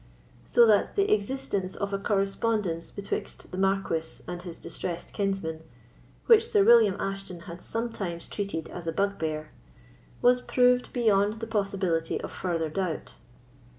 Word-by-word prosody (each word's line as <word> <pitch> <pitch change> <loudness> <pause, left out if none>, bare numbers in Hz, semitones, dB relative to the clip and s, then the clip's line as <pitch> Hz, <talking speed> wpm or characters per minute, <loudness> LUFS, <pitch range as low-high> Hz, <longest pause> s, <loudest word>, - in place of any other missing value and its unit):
So 240 - +6
that 210 -2 +3
the 400 0 +3
existence 205 -3 -1
of 200 0 -3
a 195 - 0
correspondence 195 -3 0
betwixt 200 -1 -5
the 185 - -5
Marquis 190 -4 -1
and 175 0 -5
his 175 -2 -8
distressed 175 -1 -5
kinsman, 195 -6 -2 0.6
which 455 0 +6
Sir 420 -4 +4
William 225 - +6
Ashton 195 -3 -4
had 170 +1 -9
sometimes 210 -7 -3
treated 200 -6 -4
as 175 -1 -8
a - - +1
bugbear, 160 -6 -1 0.7
was 250 0 +4
proved 250 0 +3
beyond 210 -4 +3
the 225 - -3
possibility 195 -6 -1
of - - -6
further 165 -3 -2
doubt. 175 0 -3
195 Hz, 140 wpm, -28 LUFS, 175-225 Hz, 0.7 s, So